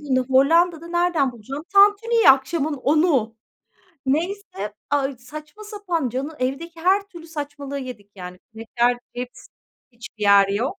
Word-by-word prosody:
bunu 260 Hz, -3 st, 0 dB
Hollanda'da 330 Hz, +5 st, +3 dB
nereden 345 Hz, -6 st, +1 dB
bulacağım, 265 Hz, +7 st, -8 dB
tantuniyi? 415 Hz, 0 st, +6 dB
Akşamın 280 Hz, +3 st, +1 dB
10.00'u. 275 Hz, -5 st, +1 dB, 0.7 s
Neyse, 305 Hz, -, -2 dB, 0.2 s
ay 280 Hz, -2 st, 0 dB
saçma 305 Hz, +10 st, -11 dB
sapan, 375 Hz, -, -3 dB
canı 275 Hz, +6 st, -5 dB
evdeki 325 Hz, +6 st, -4 dB
her 380 Hz, +4 st, +3 dB
türlü 340 Hz, -3 st, -12 dB
saçmalığı 285 Hz, -3 st, -6 dB
yedik 245 Hz, -7 st, -9 dB
yani. 180 Hz, -1 st, -9 dB, 0.2 s
Şeker, 240 Hz, +2 st, 0 dB, 0.2 s
cips... 250 Hz, 0 st, -7 dB, 0.5 s
Hiçbir 230 Hz, -2 st, -11 dB
yer 200 Hz, -1 st, +6 dB
yok. 245 Hz, -, -2 dB
280 Hz, 130 wpm, -22 LUFS, 250-340 Hz, 0.7 s, tantuniyi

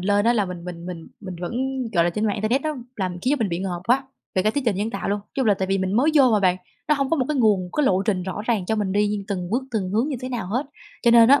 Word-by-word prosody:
lên 205 Hz, +2 st, +2 dB
á 235 Hz, -, +5 dB
là 215 Hz, -4 st, +2 dB
mình 180 Hz, -2 st, -7 dB
mình 175 Hz, -1 st, -7 dB
mình 170 Hz, -3 st, -7 dB
mình 185 Hz, -4 st, -7 dB
vẫn 175 Hz, -, -4 dB, 0.4 s
gọi 170 Hz, -2 st, +3 dB
là, 175 Hz, -, +2 dB
trên 210 Hz, +5 st, -2 dB
mạng 205 Hz, -, +1 dB
internet 220 Hz, +7 st, 0 dB
nó 310 Hz, -1 st, -2 dB, 0.2 s
làm 185 Hz, -3 st, -2 dB
khiến 260 Hz, -, +2 dB
cho -, -, -2 dB
mình 225 Hz, -4 st, 0 dB
bị 170 Hz, -1 st, -2 dB
ngợp 180 Hz, -2 st, -3 dB
quá, 255 Hz, +3 st, +3 dB, 0.3 s
về 185 Hz, -, +2 dB
cả 215 Hz, -, +3 dB
trí 285 Hz, -, -1 dB
tuệ 225 Hz, -, +3 dB
nhân 205 Hz, +4 st, -2 dB
tạo -, -, -4 dB
luôn. 205 Hz, +1 st, 0 dB
Chung 265 Hz, -3 st, 0 dB
là 210 Hz, -, +5 dB
tại 190 Hz, 0 st, -2 dB
vì 195 Hz, 0 st, +1 dB
mình 190 Hz, 0 st, -1 dB
mới 280 Hz, +6 st, +4 dB
vô 270 Hz, -4 st, +6 dB
mà 210 Hz, -, +3 dB
bạn, 185 Hz, -2 st, +3 dB, 0.3 s
nó 300 Hz, -, +5 dB
hông 275 Hz, -2 st, -1 dB
có 330 Hz, -, +3 dB
một 260 Hz, -, +1 dB
cái 300 Hz, -, 0 dB
nguồn, 215 Hz, -6 st, +4 dB, 0.2 s
cái 300 Hz, -2 st, +3 dB
lộ 190 Hz, -3 st, +3 dB
trình 195 Hz, -3 st, 0 dB
rõ 190 Hz, +3 st, -4 dB
ràng 215 Hz, -7 st, 0 dB
cho 220 Hz, -, 0 dB
mình 205 Hz, -3 st, -1 dB
đi 205 Hz, 0 st, +1 dB
từng 180 Hz, -3 st, -3 dB
bước, 245 Hz, +5 st, +1 dB
từng 205 Hz, -6 st, -2 dB
hướng 225 Hz, +8 st, +1 dB
như 285 Hz, -, -2 dB
thế 255 Hz, -, -4 dB
nào 240 Hz, -7 st, -3 dB
hết. 245 Hz, +9 st, -1 dB, 0.4 s
Cho 235 Hz, -, +5 dB
nên 230 Hz, 0 st, +7 dB
á, 280 Hz, +1 st, +7 dB
205 Hz, 325 wpm, -23 LUFS, 185-245 Hz, 0.4 s, nên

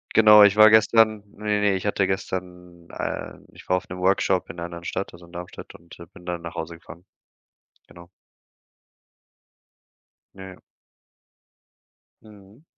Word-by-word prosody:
Genau, 105 Hz, -1 st, +8 dB
ich 100 Hz, +1 st, +4 dB
war 110 Hz, 0 st, +8 dB
gestern 110 Hz, -1 st, +3 dB
ne 105 Hz, -1 st, -1 dB
ne 100 Hz, -1 st, +2 dB
ich 95 Hz, -, -5 dB
hatte 100 Hz, -1 st, 0 dB
gestern, 90 Hz, -2 st, -6 dB
ähm -, -, -6 dB
ich -, -, -17 dB
war 90 Hz, -, +3 dB
auf -, -, -8 dB
'nem 90 Hz, 0 st, -8 dB
Workshop 95 Hz, 0 st, 0 dB
in -, -, -10 dB
'ner 85 Hz, -, -6 dB
anderen 85 Hz, 0 st, -9 dB
Stadt, 95 Hz, +2 st, -5 dB
also 85 Hz, 0 st, -14 dB
in 85 Hz, -, -20 dB
Darmstadt 90 Hz, 0 st, -10 dB
und, 85 Hz, 0 st, -16 dB
äh, 85 Hz, -, -10 dB
bin 90 Hz, -, -16 dB
dann 85 Hz, -1 st, -5 dB
nach 85 Hz, -1 st, -9 dB
Hause 80 Hz, +1 st, -6 dB
gefahren. 85 Hz, +2 st, -15 dB, 0.8 s
Genau. 85 Hz, 0 st, -16 dB, 2.3 s
Ja. 95 Hz, -1 st, -12 dB, 1.6 s
Mhm. 105 Hz, +4 st, -18 dB
95 Hz, 150 wpm, -23 LUFS, 85-105 Hz, 2.3 s, Genau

